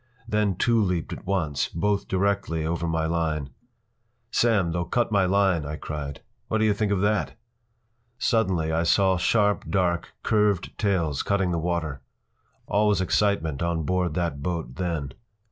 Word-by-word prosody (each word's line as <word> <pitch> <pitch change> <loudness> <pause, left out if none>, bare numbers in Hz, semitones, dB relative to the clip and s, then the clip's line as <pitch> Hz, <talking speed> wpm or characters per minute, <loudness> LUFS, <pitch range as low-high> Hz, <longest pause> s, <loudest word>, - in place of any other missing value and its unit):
Then 105 -4 +1
two 115 +4 +2
leaped 90 -5 -1
at - - -10
once, 80 -8 0
both 100 +4 -1
directly 95 -4 0
over 85 +1 -1
my 80 -1 0
line. 80 -4 -1 0.8
“Sam, 105 -8 +2
they’ll 85 +1 -1
cut 120 +7 0
my 100 -2 +3
line!” 95 -4 +2
I 75 +1 -4
cried. 75 -2 -6 0.3
“What 110 - 0
do 110 - +2
you 105 - +4
think 100 0 -1
of 100 -2 +1
that?” 105 0 0 0.8
Suddenly 95 -10 +1
I 80 +1 +1
saw 95 +2 +3
sharp, 105 +3 +1
dark, 90 -3 0
curved 105 -4 +1
tails 85 - +1
cutting 95 -3 0
the 85 - 0
water. 80 -5 -2 0.6
All 105 +1 +2
was 105 -3 +3
excitement 95 -6 +1
on 85 -1 0
board 90 0 0
that 85 -5 -2
boat 85 -7 -3
then. 85 -6 -2
90 Hz, 160 wpm, -25 LUFS, 80-100 Hz, 0.8 s, you